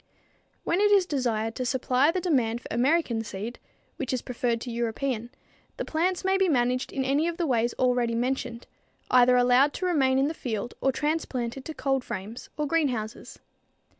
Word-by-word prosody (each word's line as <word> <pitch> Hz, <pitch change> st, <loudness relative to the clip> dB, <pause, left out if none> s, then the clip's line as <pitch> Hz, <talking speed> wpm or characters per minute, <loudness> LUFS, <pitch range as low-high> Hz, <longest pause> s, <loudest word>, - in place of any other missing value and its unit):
When 355 Hz, +4 st, +1 dB
it 415 Hz, -, +5 dB
is 400 Hz, -3 st, +5 dB
desired 230 Hz, -8 st, -1 dB
to 255 Hz, -, -3 dB
supply 255 Hz, +2 st, +2 dB
the 365 Hz, +3 st, 0 dB
demand 250 Hz, -10 st, +1 dB
for -, -, -10 dB
American 245 Hz, -1 st, +1 dB
seed, 215 Hz, +3 st, -6 dB, 0.4 s
which 260 Hz, -, -3 dB
is 255 Hz, -, -2 dB
preferred 240 Hz, -1 st, -1 dB
to 245 Hz, -, -5 dB
European, 235 Hz, +1 st, -2 dB, 0.5 s
the -, -, -3 dB
plants 355 Hz, +4 st, -1 dB
may 385 Hz, 0 st, +3 dB
be 380 Hz, -2 st, +3 dB
managed 250 Hz, -2 st, +1 dB
in 265 Hz, -1 st, -2 dB
any 285 Hz, +5 st, +2 dB
of 340 Hz, -1 st, -3 dB
the 345 Hz, -, 0 dB
ways 240 Hz, -4 st, +1 dB
already 245 Hz, -2 st, +1 dB
mentioned, 245 Hz, -1 st, -2 dB, 0.5 s
either 250 Hz, 0 st, +6 dB
allowed 250 Hz, +4 st, +4 dB
to 370 Hz, -, -3 dB
remain 270 Hz, -7 st, +2 dB
in 270 Hz, +1 st, +3 dB
the 315 Hz, -, -2 dB
field 235 Hz, -5 st, -4 dB
or 270 Hz, -, +3 dB
transplanted 270 Hz, -4 st, -2 dB
to 315 Hz, -, -6 dB
cold 270 Hz, -2 st, 0 dB
frames, 210 Hz, +4 st, -7 dB
or 300 Hz, -, 0 dB
greenhouses. 260 Hz, -8 st, -2 dB
255 Hz, 180 wpm, -27 LUFS, 235-300 Hz, 0.5 s, either